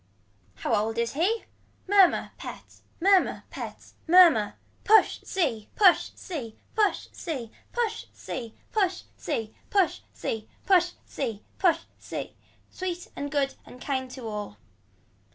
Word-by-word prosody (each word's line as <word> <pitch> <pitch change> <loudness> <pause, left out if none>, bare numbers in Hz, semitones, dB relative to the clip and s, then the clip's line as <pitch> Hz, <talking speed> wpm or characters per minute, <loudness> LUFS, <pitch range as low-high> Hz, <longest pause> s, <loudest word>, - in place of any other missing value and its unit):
How - - -2
old 220 +2 +1
is 235 0 0
he. 380 +10 +1 0.4
Murmur 390 -2 +5
pet - - -9 0.2
murmur 385 +1 +4
pet - - -8
murmur. 320 - +7 0.3
Push 435 +1 +5
sea 260 - -1
push 380 -4 +6
sea 255 -12 -6 0.2
push 425 -3 +1
sea 260 -10 -5 0.2
push 455 -2 -1
sea 230 -3 -6 0.2
push 390 -4 +2 0.2
sea 225 - -2 0.2
push 390 -4 +2
sea 220 -1 -3 0.2
push 355 -2 +4
sea 225 -6 -4 0.2
push 360 -3 +4 0.2
sea. - - -6 0.4
Sweet 360 -1 -4
and 285 - -3
good 280 -2 +1
and 250 - -13
kind 260 -1 -2
to 250 -2 -7
all. 210 - -5
320 Hz, 125 wpm, -27 LUFS, 230-380 Hz, 0.4 s, murmur